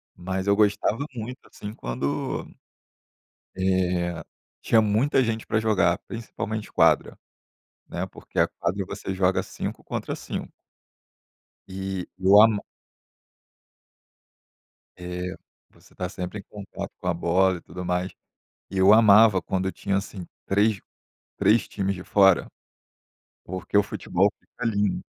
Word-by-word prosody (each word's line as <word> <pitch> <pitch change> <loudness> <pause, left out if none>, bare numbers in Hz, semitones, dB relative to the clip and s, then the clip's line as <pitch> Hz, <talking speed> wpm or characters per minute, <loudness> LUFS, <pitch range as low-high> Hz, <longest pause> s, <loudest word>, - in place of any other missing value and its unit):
Mas 95 +2 -4
eu 100 - +4
gostava 105 +5 +2
muito, 120 +3 -6
assim, 105 +1 -8
quando, 70 - -3 1.1
eh, 90 -2 0 0.4
tinha 110 -1 +4
muita 115 +7 +2
gente 115 -1 -2
pra 110 - +1
jogar, 105 -5 +2
principalmente 110 -2 -5
quadra, - - +3 0.7
né, - - -3
porque - - -7
a - - +5
quadra 95 +3 -3
você 95 - -5
joga 95 0 +2
5 - - -6
contra - - -4
5. - - -6 1.2
E 95 -1 -4
eu 95 +1 +5
amo 110 -2 +5 2.3
É, 90 +1 -5 0.4
você - - -22
tá 90 - -3
sempre 90 +2 -6
em - - -14
contato 100 0 -8
com - - -8
a 90 - +2
bola 90 +2 +2
e - - -16
tudo 90 - -8
mais. 90 +1 -1 0.6
E 95 - -5
eu 95 +2 +7
amava 110 -2 +7
quando 95 +3 -2
eu - - -1
tinha, 100 0 -1
assim, 100 -2 -5 0.2
3- 105 +1 +2 0.6
3 115 +1 +4
times 100 -1 -2
de 90 0 -9
fora, 95 -3 +4 1.0
porque 95 +2 -6
o - - +7
futebol 100 -1 0
fica 125 - -9
lindo. 105 -3 0
95 Hz, 130 wpm, -25 LUFS, 90-105 Hz, 2.3 s, eu